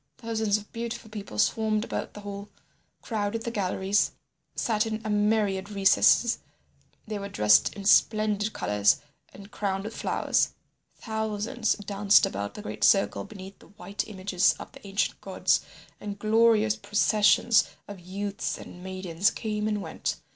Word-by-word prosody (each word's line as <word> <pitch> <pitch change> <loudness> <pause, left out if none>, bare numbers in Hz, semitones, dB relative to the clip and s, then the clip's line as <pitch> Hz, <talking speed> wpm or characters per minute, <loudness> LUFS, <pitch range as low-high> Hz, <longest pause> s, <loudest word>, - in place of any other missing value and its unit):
Thousands 220 -3 0
of 210 0 -12
beautiful 235 -1 -5
people 200 - -7
swarmed 215 - +1
about - - -5
the 210 - -8
hall, 200 0 -7 0.5
crowded 220 0 -2
the 235 - -3
galleries, 195 -1 0 0.4
sat 220 -1 0
in 220 -1 -3
a 215 - -1
myriad 205 -2 +1
recesses; 205 +4 +4 0.7
they 215 -1 -4
were 200 0 -6
dressed 105 - +4
in 200 - -8
splendid 215 0 +3
colours 105 - +2 0.3
and 200 +1 -13
crowned 195 -1 -2
with 220 +2 -7
flowers; - - 0 0.4
thousands 220 0 -2
danced 205 0 +3
about 100 +1 -4
the 210 - -8
great - - -6
circle 195 -1 +3
beneath 195 -2 -11
the - - -18
white 200 0 -6
images 190 -3 +1
of - - -10
the - - -13
ancient 195 +1 -1
gods, - - +1 0.4
and 205 -1 -6
glorious 220 0 +3
processions 210 +2 +3 0.2
of 205 -2 -9
youths 195 +3 -4
and 180 - -11
maidens 185 0 0
came 215 -1 -3
and 210 -2 -1
went. - - -3
205 Hz, 145 wpm, -27 LUFS, 195-215 Hz, 0.7 s, recesses